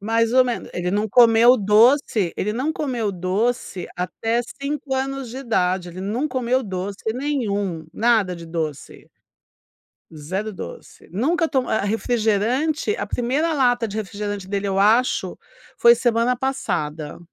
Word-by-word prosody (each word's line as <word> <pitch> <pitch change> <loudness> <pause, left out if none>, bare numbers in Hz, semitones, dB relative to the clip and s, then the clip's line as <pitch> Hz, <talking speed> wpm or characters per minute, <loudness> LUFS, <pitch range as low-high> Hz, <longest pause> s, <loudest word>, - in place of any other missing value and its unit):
Mais 225 +2 +1
ou 260 - +4 0.4
ele 180 0 -2
não 210 +2 0
comeu 235 +2 +6
doce 215 - +3
ele 210 +2 -1
não 275 +6 -1
comeu 245 -10 -2
doce 190 +1 -2
até 225 +6 -1 0.2
5 280 -1 -3
anos 270 -1 -3
de 250 - -8
idade 185 -8 0
ele 185 - -8
não 220 +10 -1
comeu 255 0 0
doce 195 0 -5
nenhum, 205 - -2
nada 220 -5 +2
de 170 -1 -10
doce. 160 -3 -5 1.0
0 185 +8 -4
doce - - -10
nunca 325 - +1
to 275 -4 +1
a - - 0
a 200 - -2
refrigerante 240 - 0
a - - -3
1º 280 +7 0
lata 245 -5 +2
de 210 - -6
refrigerante 205 -1 -4
dele, 200 0 -2
eu 195 0 -1
acho, 225 +5 +2 0.4
foi 235 0 +7
semana 240 +1 +1
passada. 155 - -3
225 Hz, 140 wpm, -22 LUFS, 195-255 Hz, 1.0 s, foi